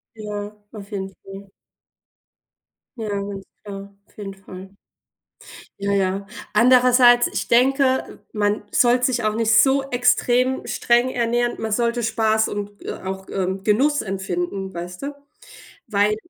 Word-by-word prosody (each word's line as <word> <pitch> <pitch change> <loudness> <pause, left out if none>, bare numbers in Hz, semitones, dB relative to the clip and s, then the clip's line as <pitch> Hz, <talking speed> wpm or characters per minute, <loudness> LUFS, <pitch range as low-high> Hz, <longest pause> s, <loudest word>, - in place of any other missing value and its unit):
Ja, 210 -1 -6 0.2
auf 205 -2 -10
jeden 195 -2 -4
Fall. 195 0 -11 1.5
Ja, 220 -2 -4
ganz 200 -1 -4 0.2
klar. 200 -1 -9
Auf - - -30
jeden 195 -2 -6
Fall. 190 0 -12 1.0
Ja, 200 0 -1
ja. 195 0 0 0.3
Andererseits, 245 +1 +6
ich - - -4
denke, 260 +2 +2
man 210 -1 0
sollte 245 0 +4
sich 245 -3 -1
auch 215 - +1
nicht 225 0 +1
so 270 +3 +5
extrem 250 +1 +2
streng 240 +1 +2
ernähren, 240 0 0
man 220 -1 -3
sollte 235 +2 0
Spaß 220 -1 +1
und, 205 0 -6
äh, - - -4
auch, 190 0 -5
ähm, 190 0 -2
Genuss 275 +8 +2
empfinden, 190 0 -3
weißt 175 +1 -7
du? 285 +1 -4 0.7
Weil 210 0 +2
210 Hz, 135 wpm, -22 LUFS, 195-240 Hz, 1.5 s, Andererseits